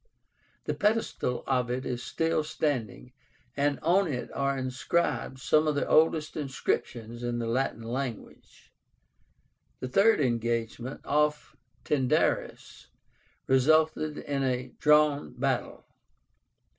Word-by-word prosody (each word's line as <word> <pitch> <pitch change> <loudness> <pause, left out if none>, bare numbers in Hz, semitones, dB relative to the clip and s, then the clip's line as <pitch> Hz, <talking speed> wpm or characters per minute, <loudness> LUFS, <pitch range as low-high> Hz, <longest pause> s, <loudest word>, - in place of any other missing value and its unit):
The - - -2
pedestal 210 - 0
of 125 -2 0
it 130 +2 -2
is 125 -1 -3
still 165 +2 0
standing, 125 -6 -3 0.4
and 145 0 +1
on 180 +4 +3
it 125 -2 -4
are 140 0 0
inscribed 130 +1 -1
some 155 +3 +2
of 150 - +1
the 145 - -1
oldest 155 -1 +3
inscriptions 120 -5 -3
in 120 0 -2
the 120 - -2
Latin 115 0 -1
language. 120 0 -6 1.1
The 130 - -4
third 200 - +4
engagement, 120 0 -2
off 150 0 0 0.3
Tyndaris, 130 -4 0 0.6
resulted 155 +3 +2
in 140 -1 -3
a 125 -1 -1
drawn 150 -1 +3
battle. - - -2
135 Hz, 110 wpm, -28 LUFS, 125-150 Hz, 1.1 s, third